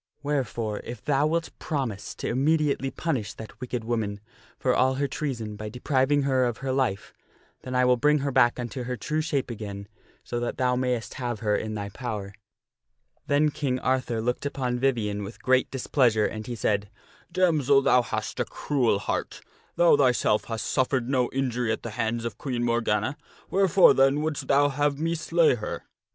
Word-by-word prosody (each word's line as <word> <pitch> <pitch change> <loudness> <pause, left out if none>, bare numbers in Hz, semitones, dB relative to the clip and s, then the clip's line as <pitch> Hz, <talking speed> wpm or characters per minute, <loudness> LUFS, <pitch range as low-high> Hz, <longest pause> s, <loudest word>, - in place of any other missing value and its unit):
Wherefore, 120 -7 -2
if 120 -2 -8
thou 145 +1 +2
wilt 165 +1 -1
promise 125 -9 -3
to - - -4
immediately 140 +1 +1
punish 135 -8 -3
that 110 +3 -11
wicked 125 -2 -3
woman 110 -3 -2 0.4
for 125 - +1
all 130 +1 +3
her 140 +1 0
treason 120 -7 -4
by 105 +1 -6
depriving 135 +4 +1
her 130 -2 +2
of 120 -2 -2
her 130 - 0
life, 130 -7 -1 0.5
then 130 - -6
will 125 0 +4
I - - -10
bring 150 +4 +4
her 140 - 0
back 120 -1 +3
unto 120 +1 -4
her 125 0 -3
true 155 +5 -1
shape 145 -5 -1
again 100 -3 -6 0.4
so 120 - -3
that 120 - -3
thou 125 -1 +2
mayst 125 -3 -1
have 120 -4 -3
her 105 -1 +1
in 110 0 -3
thy 100 -1 -4
power." 105 -3 -5 0.9
Then 150 +1 +3
King 135 -3 -1
Arthur 130 -3 0
looked 125 +1 -1
upon 125 -3 -2
Vivien 115 -6 0
with 100 +3 -9
great 130 0 +3
displeasure, 120 -4 +2
and 110 -1 -4
he 120 - -4
said, 105 -2 0 0.2
" - - -29
Damsel, 155 -7 +3
thou 125 - +5
hast 120 - -4
a - - +1
cruel 130 -8 0
heart! - - -3 0.3
Thou 175 -3 +6
thyself 125 -6 +2
hast 115 -1 -4
suffered 130 -2 0
no 125 -3 +2
injury 125 -3 -1
at 110 - -3
the 115 - -5
hands 115 +1 -2
of 115 - -5
Queen 125 -4 -2
Morgana; 120 +3 0 0.3
wherefore, 195 -1 +6
then, 135 +2 +3
wouldst 155 -1 -3
thou 145 +1 +4
have 145 0 0
me 165 +3 0
slay 165 -1 +3
her? 115 -4 -5
125 Hz, 185 wpm, -26 LUFS, 115-140 Hz, 0.9 s, Thou